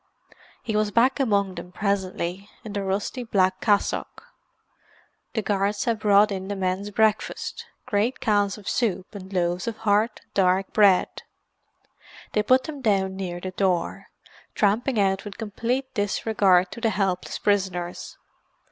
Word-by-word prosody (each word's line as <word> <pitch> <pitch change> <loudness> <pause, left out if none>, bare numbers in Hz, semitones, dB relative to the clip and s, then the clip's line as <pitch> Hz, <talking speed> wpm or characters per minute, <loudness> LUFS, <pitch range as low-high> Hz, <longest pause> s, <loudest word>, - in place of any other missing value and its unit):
He 220 - -2
was 210 0 +2
back 240 +6 +3
among 200 -7 +1
them, 180 0 -9
presently, 190 -1 -2
in 215 -3 -7
the 200 - -2
rusty 200 +6 -2
black 190 -4 +1
cassock. 205 -2 0 1.1
The 220 - 0
guards 200 0 0
had 230 -2 0
brought 210 0 +5
in 190 -1 -4
the 205 - -3
men's 190 +1 -2
breakfast—great 215 +2 -1
cans 205 -2 +1
of 205 - -13
soup 205 -5 -1
and 190 -2 -9
loaves 175 +1 -1
of 225 -2 -3
hard, 215 +1 +1
dark 190 0 +2
bread. 200 -4 +4 1.1
They 210 - +3
put 255 +4 +4
them 290 -2 -7
down 195 -5 +1
near 180 -2 -4
the 185 +1 -5
door, 185 -3 -1 0.5
tramping 220 +4 +1
out 195 -1 +1
with 205 -2 -8
complete 235 +4 -3
disregard 200 -3 +2
of 235 - -9
the 225 - +2
helpless 190 -3 -1
prisoners. 185 -4 -1
200 Hz, 140 wpm, -25 LUFS, 190-220 Hz, 1.1 s, brought